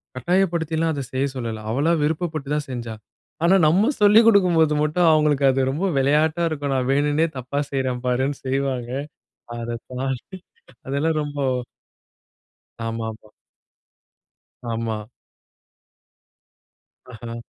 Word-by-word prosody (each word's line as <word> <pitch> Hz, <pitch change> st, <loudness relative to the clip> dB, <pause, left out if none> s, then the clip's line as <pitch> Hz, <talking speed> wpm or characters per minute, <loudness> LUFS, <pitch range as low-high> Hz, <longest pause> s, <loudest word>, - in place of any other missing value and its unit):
கட்டாயப்படுத்திலாம் 165 Hz, +1 st, 0 dB
அத 140 Hz, -, -3 dB
செய்ய 130 Hz, +1 st, 0 dB
சொல்லல, 115 Hz, -3 st, -4 dB
அவளா 145 Hz, +7 st, +1 dB
விருப்பப்பட்டு 155 Hz, -2 st, -2 dB
தான் 150 Hz, 0 st, -2 dB
செஞ்சா. 120 Hz, -3 st, -5 dB, 0.5 s
ஆனா, 175 Hz, +3 st, +5 dB
நம்ம 190 Hz, -, +4 dB
சொல்லிக் 210 Hz, +2 st, +7 dB
குடுக்கும்போது 175 Hz, -7 st, +4 dB
மட்டும் 165 Hz, +3 st, +2 dB
அவங்களுக்கு 150 Hz, -2 st, +3 dB
அது 135 Hz, 0 st, +2 dB
ரொம்ப 165 Hz, +8 st, -2 dB
விளையாட்டா 150 Hz, +5 st, +2 dB
இருக்கும். 145 Hz, -3 st, -2 dB
நான் 130 Hz, -1 st, 0 dB
வேணுன்னே 145 Hz, +3 st, +2 dB
தப்பா 130 Hz, +3 st, -3 dB
செய்றேன் 130 Hz, -2 st, -1 dB
பாருன்னு 130 Hz, +3 st, 0 dB
செய்வாங்க. 130 Hz, -2 st, -1 dB, 0.7 s
அத 120 Hz, 0 st, -4 dB, 0.2 s
தாண்டி 135 Hz, +8 st, -4 dB, 0.5 s
அதெல்லாம் 150 Hz, +4 st, 0 dB
ரொம்போ 145 Hz, -1 st, -3 dB, 1.4 s
ஆமாமா. 110 Hz, -1 st, -5 dB, 1.4 s
ஆமா. 110 Hz, -2 st, -3 dB, 2.1 s
அஹ. 115 Hz, 0 st, -7 dB
140 Hz, 105 wpm, -22 LUFS, 125-160 Hz, 2.1 s, சொல்லிக்